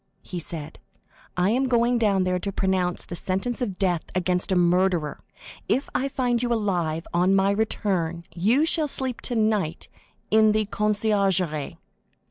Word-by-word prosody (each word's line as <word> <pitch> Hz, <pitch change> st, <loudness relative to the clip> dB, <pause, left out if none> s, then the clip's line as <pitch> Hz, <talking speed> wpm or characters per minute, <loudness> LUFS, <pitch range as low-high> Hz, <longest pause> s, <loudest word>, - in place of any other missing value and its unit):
he 180 Hz, -, -6 dB
said. 160 Hz, -1 st, -5 dB, 0.6 s
"I 180 Hz, +3 st, +2 dB
am 260 Hz, +3 st, +1 dB
going 240 Hz, 0 st, +2 dB
down 200 Hz, -4 st, +2 dB
there 180 Hz, 0 st, 0 dB
to 200 Hz, +2 st, -3 dB
pronounce 185 Hz, -2 st, -1 dB
the 175 Hz, -, -7 dB
sentence 195 Hz, +9 st, -2 dB
of 200 Hz, -7 st, -2 dB
death 180 Hz, -4 st, +1 dB
against 180 Hz, +1 st, 0 dB
a -, -, +3 dB
murderer. 175 Hz, -2 st, +1 dB, 0.5 s
If 270 Hz, -, 0 dB
I 270 Hz, -, 0 dB
find 245 Hz, -3 st, 0 dB
you 245 Hz, -1 st, -1 dB
alive 175 Hz, -8 st, -1 dB
on 180 Hz, +3 st, +3 dB
my 195 Hz, +1 st, +3 dB
return, 190 Hz, -5 st, -1 dB
you 225 Hz, -, +2 dB
shall 320 Hz, -2 st, +1 dB
sleep 260 Hz, -3 st, -1 dB
tonight 215 Hz, -8 st, -1 dB, 0.4 s
in 215 Hz, 0 st, +5 dB
the 215 Hz, 0 st, +1 dB
conciergerie." 200 Hz, -7 st, 0 dB
195 Hz, 150 wpm, -24 LUFS, 180-225 Hz, 0.6 s, in